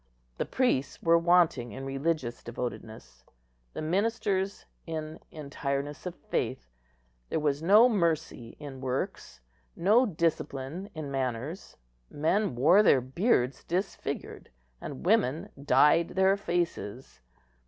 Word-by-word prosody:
The - - 0
priests 245 - 0
were 170 0 +5
wanting 170 - +3
in 135 +3 -7
religious 135 -2 -2
devotedness, 110 - -7 0.5
the - - -5
ministers 200 +2 -1 0.2
in 155 -1 -5
entireness 145 +1 -4
of 180 - -6
faith; - - -3 0.6
there - - 0
was 145 -1 0
no 210 +8 +7
mercy 160 - -1
in 140 -3 -8
works, 130 - -4 0.3
no 220 +8 +4
discipline 165 0 -2
in 150 -3 -5
manners. 135 +5 -4 0.3
Men 160 - 0
wore 160 - +6
their 165 -10 +5
beards 130 - 0
disfigured, 185 +2 -4 0.3
and 140 - -7
woman 175 - +2
dyed 150 +5 +5
their 190 +1 +3
faces. 170 - -3
155 Hz, 110 wpm, -29 LUFS, 130-180 Hz, 0.6 s, no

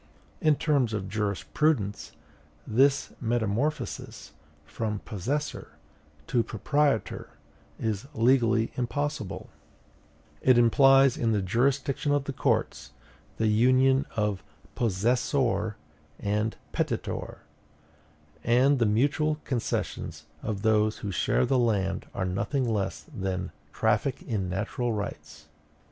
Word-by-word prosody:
In 155 -1 +4
the - - -17
terms 140 -7 +2
of 100 -2 -3
jurisprudence, 105 - -1 0.5
this 135 +5 +2
metamorphosis 120 +5 -2 0.3
from 105 +4 -3
possessor 130 +9 -3 0.5
to 120 - +1
proprietor 140 +3 0 0.5
is 110 +2 -2
legally 115 -2 +3
impossible; 145 -2 -3 0.9
it 130 -2 +5
implies 135 +2 +5
in 115 -2 +1
the 105 - +1
jurisdiction 135 - +1
of 145 -1 +1
the 140 - -5
courts - - -1 0.4
the 110 - +1
union 130 +5 +4
of 105 -3 0 0.3
possessoire 115 +1 +1 0.4
and 105 +2 -1 0.2
petitoire; - - -3 1.0
and 130 +4 +4
the 115 - +3
mutual 145 +8 +2
concessions 125 -4 -3 0.2
of 105 -2 -4
those 110 -1 +3
who 100 - -2
share 65 -8 +1
the 130 - +2
land 100 -5 0
are 95 - -1
nothing 120 +8 -1
less 100 -4 -2
than 95 -2 -3 0.2
traffic - - 0
in 95 -5 -2
natural 110 +5 -2
rights. 100 -7 -6
115 Hz, 105 wpm, -27 LUFS, 105-135 Hz, 1.0 s, it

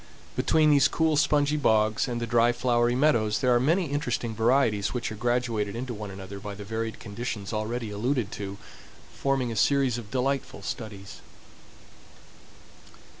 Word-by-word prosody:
Between 155 -1 +3
these 145 -1 +5
cool, 160 +1 +1
spongy 150 0 +2
bogs 110 -5 +2
and 120 -2 -3
the 120 - -2
dry, 120 +1 +3
flowery 120 -1 +1
meadows 115 -7 +2
there 125 -1 +3
are 120 - +4
many 165 +8 +2
interesting 120 -5 -2
varieties 115 -2 +2
which 120 -2 -2
are - - -5
graduated 115 -2 -1
into 125 +1 -4
one 105 -2 -6
another 95 0 -8
by 100 0 -7
the 105 - -8
varied 110 +2 -4
conditions 105 -1 -5
already 110 +1 -3
alluded 115 +1 -1
to, 100 -1 -6 0.6
forming 135 -3 0
a - - -4
series 130 +1 +2
of 110 -3 -10
delightful 135 +2 -2
studies. 100 -4 -7
120 Hz, 155 wpm, -27 LUFS, 105-130 Hz, 0.6 s, these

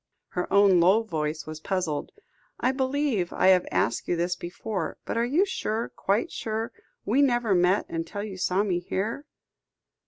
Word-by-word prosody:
Her 180 - -3
own 200 -2 +6
low 190 +7 +5
voice 155 -6 -3
was 155 0 -7
puzzled. 175 -4 -2 0.5
"I 255 - +2
believe 265 -7 0
I - - +3
have 185 -1 +4
asked 115 - 0
you 175 - +1
this 175 +1 0
before; 185 +4 -4
but - - -3
are 230 +1 +2
you 320 +10 +3
sure, 230 - -2
quite 200 +4 0
sure, 225 +1 -3 0.3
we 245 +7 +3
never 240 -6 +3
met 180 +2 +3
until 165 +5 -4
you 195 -3 -7
saw 185 +2 +1
me 185 -4 0
here?" 210 +10 -3
195 Hz, 165 wpm, -26 LUFS, 175-230 Hz, 0.5 s, own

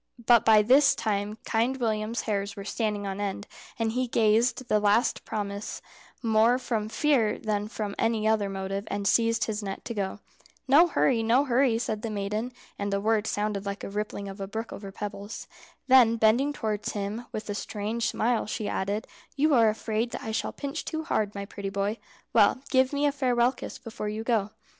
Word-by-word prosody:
But 235 -1 +6
by 220 -2 +6
this 270 +6 +5
time 210 -1 -2
Kind 235 +4 +1
William's 220 -1 -1
hairs 200 -1 -2
were 200 -2 -7
standing 210 -1 -2
on 195 +1 -4
end, 200 0 -3 0.3
and 225 -1 0
he 250 +2 -1
gave 230 +1 +3
the 240 -5 0
last 210 +3 +2
promise 200 -1 -4 0.4
more 225 +2 +4
from 225 -4 -2
fear 250 -5 +2
than 210 -1 -2
from 210 -2 -4
any 225 -1 +1
other 215 -2 +2
motive, 195 +1 -4
and 200 -1 -2
seized 230 +2 +3
his 215 -1 -2
net 195 -1 -6
to 235 - -4
go. 200 -1 -3 0.5
"No 300 +6 +7
hurry, 255 -7 +2
no 240 +5 +3
hurry," 250 -2 +3
said 220 -2 -3
the 230 - -3
maiden 210 +3 -3 0.3
(and 200 0 -2
the 200 - +1
words 220 +1 +1
sounded 205 -1 -2
like 200 0 -4
the - - -6
rippling 205 -1 -4
of 195 +1 -8
a 195 - -3
brook 225 +3 -5
over 200 -1 -8
pebbles). 205 +1 -6 0.4
Then 255 -3 +6
bending 230 +6 +3
towards 215 -7 -3
him, 210 +3 -4
with 215 - -5
a 205 - -2
strange 215 +2 -2
smile, 235 -1 0
she 215 0 -3
added, 200 +3 -2 0.3
"You 300 +2 +3
are 230 -4 +6
afraid 220 +2 -1
that - - -5
I 220 - -4
shall 220 - -2
pinch 280 -1 -5
too 315 -1 -4
hard, 215 -10 -1
my 200 0 -4
pretty 200 -1 -6
boy. 200 +3 -2 0.3
Well, 230 +4 +4
give 260 -1 +4
me 285 0 0
a 290 - +3
farewell 250 -3 +2
kiss 255 - -8
before 220 -2 -6
you 215 +1 -4
go." 225 -4 +1
220 Hz, 195 wpm, -27 LUFS, 205-235 Hz, 0.5 s, No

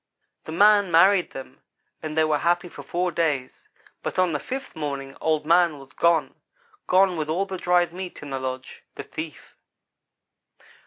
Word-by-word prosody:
The - - -7
man 205 +3 +5
married 180 +3 +5
them, 130 0 -10 0.4
and 155 0 -5
they 160 - +5
were 155 -1 +1
happy 175 +1 +1
for - - -10
four 180 +1 -2
days, 150 -6 -2 0.3
but - - -5
on 185 -2 +3
the 150 - -1
fifth 265 - -6
morning 140 -3 -5
Old 155 -1 0
man 170 -1 +3
was 135 0 -14
gone 170 -1 +2 0.5
gone 185 -1 +4
with 155 -1 -3
all 180 +5 0
the 190 -2 -6
dried 175 -1 +2
meat 180 -3 -7
in 145 - -8
the 135 - -2
lodge 130 0 -6
the - - -6
thief. 155 -1 -8
165 Hz, 170 wpm, -24 LUFS, 150-180 Hz, 0.5 s, man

